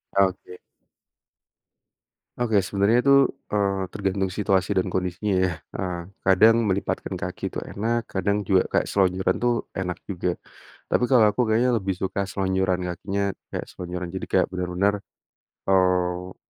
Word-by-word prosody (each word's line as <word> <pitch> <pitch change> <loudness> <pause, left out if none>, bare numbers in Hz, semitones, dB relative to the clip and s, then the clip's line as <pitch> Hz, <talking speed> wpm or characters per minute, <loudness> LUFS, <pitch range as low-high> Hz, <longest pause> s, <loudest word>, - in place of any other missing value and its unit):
Oke. 95 -2 0 1.8
Oke, 110 -5 +2
sebenarnya 100 +5 +2
itu, 140 +2 +4 0.4
eee, 100 -2 0
tergantung 95 0 -1
situasi 95 0 0
dan 95 - +2
kondisinya 95 +3 -1
ya, 90 - 0 0.2
eee, 90 -2 -3 0.2
kadang 105 +4 +6
melipatkan 95 +1 -2
kaki - - -4
tuh - - -4
enak, 115 +2 -1
kadang 100 +2 +1
juga 95 -1 +4
kayak - - +1
selonjoran 95 -1 +2
tuh 120 0 +3 0.2
enak 90 -3 -3
juga. 90 -2 -2 0.5
Tapi - - +2
kalau 120 -4 +6
aku 105 - -1
kayaknya 115 +3 +2
lebih 95 -3 -1
suka 100 +1 -1
selonjoran 95 -1 0
kakinya 100 +3 -3 0.3
kayak - - -4
selonjoran, 90 0 -6
jadi 95 - -4
kayak - - +4
bener-bener, 90 +2 0 0.8
eee, 90 -1 +1
95 Hz, 135 wpm, -24 LUFS, 90-100 Hz, 1.8 s, kadang